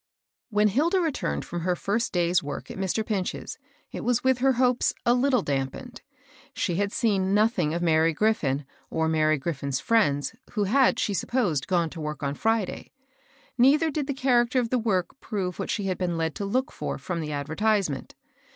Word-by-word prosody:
I 205 - -5
HEN 210 - +5
Hilda 320 - +2
returned 270 - -1
from 175 - -4
her 180 +1 0
first 215 +6 -1
day's 175 -1 +2
work 145 0 -6
at - - -8
Mr. 195 +3 -1
Pinch's, 195 -5 -3 0.3
it - - -6
was 245 -1 +1
with 260 -1 +3
her 265 +1 +3
hopes 250 0 +2
a 240 - +5
little 250 -3 +2
dampened. 135 -2 -4 0.5
She 170 - -1
had 200 0 0
seen 200 -5 +1
nothing 210 -7 +2
of 175 - -2
Mary 160 0 +3
Griffin 155 -7 0 0.2
or 160 0 0
Mary 155 -1 +2
Grif 150 +2 -3
fin's 140 -2 -2
fiiends, 145 -9 +1 0.2
who 210 -3 +1
had, 255 +7 +3
she 205 - 0
supposed, 195 - 0
gone 170 -4 +1
to 165 - -7
work 150 -1 -5
on 140 0 -1
Friday. 220 +3 -1 0.7
Neither 300 +6 +5
did 290 -1 -2
the 280 - -2
character 255 -1 +2
of 235 -2 -2
the 255 - +2
work 210 +1 -1
prove 185 -5 -4
what - - -3
she 205 - -1
had 185 -2 -2
been 175 -2 -1
led 160 -1 -1
to 200 - -4
look 255 +6 -1
for - - -4
from 170 -2 -4
the 150 -1 -4
advertisement. 160 +2 -1
195 Hz, 195 wpm, -26 LUFS, 160-240 Hz, 0.7 s, HEN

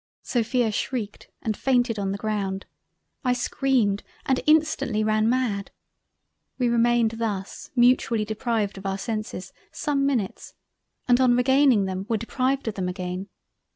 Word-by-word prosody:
Sophia 240 -1 +1
shreiked 215 -1 -3 0.2
and 220 -2 -1
fainted 245 -4 +1
on 195 -1 -1
the 200 - -2
ground—I 205 +4 -4
screamed 245 -5 +1 0.2
and 265 -1 +1
instantly 305 -8 +3
ran 215 +1 +2
mad—. 235 -6 0 0.9
We 250 -2 +1
remained 235 -1 +3
thus 205 -4 -4
mutually 240 -3 +3
deprived 215 -2 -2
of 195 - -5
our 195 0 -1
senses, 215 -3 -5 0.2
some 280 -2 0
minutes, 235 -9 -2 0.5
and 245 +1 +4
on 245 -1 +4
regaining 260 -4 +4
them 190 +1 -4
were 225 - +2
deprived 255 +4 -1
of 220 - -1
them 185 -2 -2
again. 180 +1 -5
225 Hz, 135 wpm, -25 LUFS, 200-250 Hz, 0.9 s, and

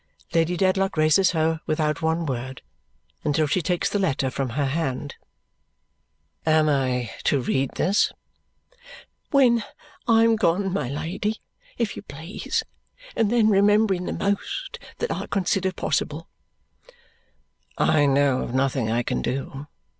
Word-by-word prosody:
Lady 165 +1 +2
Dedlock 190 -1 +1
raises 155 +5 +4
her 160 -1 0
without 155 0 0
one 160 +1 0
word, 130 -1 -4 0.6
until 155 +1 +2
she 165 +5 0
takes 175 +1 0
the 205 - -1
letter 135 -8 0
from 135 0 -2
her 145 - +2
hand. 140 -1 -2 1.3
"Am 155 -1 +3
I 130 -6 0
to 140 - +3
read 130 +1 -1
this?" 195 +4 +2 1.2
"When 245 -5 +4 0.4
I 225 -1 +5
am 230 -1 +4
gone, 190 -1 +1
my 160 -11 -1
Lady, 175 +9 -3 0.4
if 230 -3 -1
you - - -7
please, 160 +7 -4 0.5
and 220 -2 +1
then 230 -3 +4
remembering 200 -2 +3
the - - -2
most 200 - -2 0.2
that 475 - -2
I - - -3
consider 190 -1 0
possible." - - -2 1.5
"I 145 -2 +3
know 140 -1 +3
of 120 - -4
nothing 130 -3 +1
I 120 +2 +1
can - - -2
do. 135 +2 -4
160 Hz, 135 wpm, -24 LUFS, 140-195 Hz, 1.5 s, I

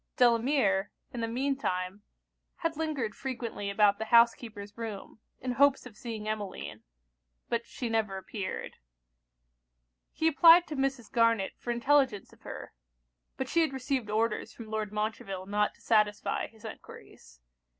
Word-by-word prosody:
Delamere, 235 -5 +3 0.2
in 240 - -4
the 230 - 0
mean 265 +4 0
time, 185 -4 -3 0.5
had 330 -1 -2
lingered 290 -9 -2
frequently 235 -6 -4
about 200 0 +4
the 220 - -2
housekeeper's 225 -3 +3
room, 225 -2 -7 0.2
in 255 - -3
hopes 275 +1 +4
of 240 -4 -11
seeing 220 -2 -6
Emmeline; 210 -3 -4 0.7
but 235 0 -1
she 245 - -4
never 220 -4 0
appeared. 190 0 -5 1.3
He 320 - 0
applied 330 +2 +8
to 305 - -6
Mrs. 270 -4 -1
Garnet 230 -5 +3
for - - -9
intelligence 250 -2 +2
of - - -21
her: - - -8 0.6
but 265 - -2
she 335 +5 +2
had 315 -4 +1
received 260 -3 -2
orders 220 +1 0
from 220 -2 -10
Lord 215 -1 -2
Montreville 210 -3 -3
not 210 +1 0
to - - -25
satisfy 210 -2 +1
his 225 0 -17
enquiries. 60 - -12
230 Hz, 145 wpm, -30 LUFS, 210-260 Hz, 1.3 s, applied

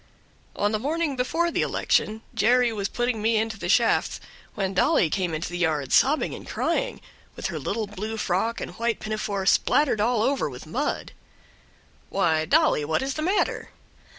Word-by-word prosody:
On 205 +1 +1
the 215 - 0
morning 300 +3 -1
before 330 +7 0
the - - 0
election, 220 +1 0
Jerry 245 +1 +3
was 200 -2 -2
putting 240 -2 -1
me 225 +1 +2
into 220 -1 -2
the - - -4
shafts, - - +2 0.4
when 195 -2 -1
Dolly 180 -3 +3
came 185 -3 0
into 160 +1 -3
the 175 0 -5
yard 150 -6 0
sobbing 295 +4 +3
and - - -9
crying, - - -1 0.3
with - - -7
her - - -3
little 220 +1 -2
blue 210 +2 -5
frock 220 +4 -1
and - - -5
white 235 -1 0
pinafore 215 -2 -3
spattered 255 +2 +3
all 230 0 +2
over 270 - +1
with 125 -2 -10
mud. 255 - -3 1.0
"Why, 160 -5 +1
Dolly, 150 - +3
what 155 - 0
is 270 0 -2
the 310 - -4
matter?" 375 +6 0
220 Hz, 175 wpm, -25 LUFS, 190-250 Hz, 1.0 s, Jerry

